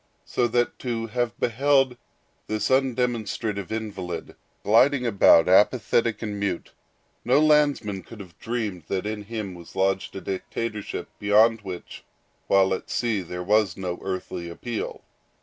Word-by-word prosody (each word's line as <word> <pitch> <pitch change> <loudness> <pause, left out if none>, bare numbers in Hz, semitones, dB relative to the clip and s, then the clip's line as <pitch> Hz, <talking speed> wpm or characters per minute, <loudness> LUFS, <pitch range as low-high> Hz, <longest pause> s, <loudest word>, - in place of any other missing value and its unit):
So 120 - +1
that 120 +1 0
to 115 -3 -2
have 120 +1 -2
beheld 135 +1 +2 0.5
this 110 0 -1
undemonstrative 120 -6 0
invalid 100 -6 -5 0.3
gliding 125 +5 +4
about, 100 -7 +6
apathetic 115 +3 +3
and 105 -2 -4
mute, 100 -4 -2 0.5
no 125 +4 +4
landsman 145 -10 +3
could 115 - -13
have 90 -5 -11
dreamed 110 -8 -3
that 95 0 -2
in 105 -1 -4
him 105 -3 -5
was 85 -1 -13
lodged 95 0 0
a 95 - -5
dictatorship 105 +2 -4
beyond 110 +2 +4
which, 95 -3 -8 0.4
while 95 -1 +4
at - - -5
sea, 115 -5 0
there 90 0 -6
was 105 -1 +2
no 90 -2 -4
earthly 95 -2 -4
appeal. 115 +6 -5
105 Hz, 135 wpm, -25 LUFS, 95-120 Hz, 0.5 s, about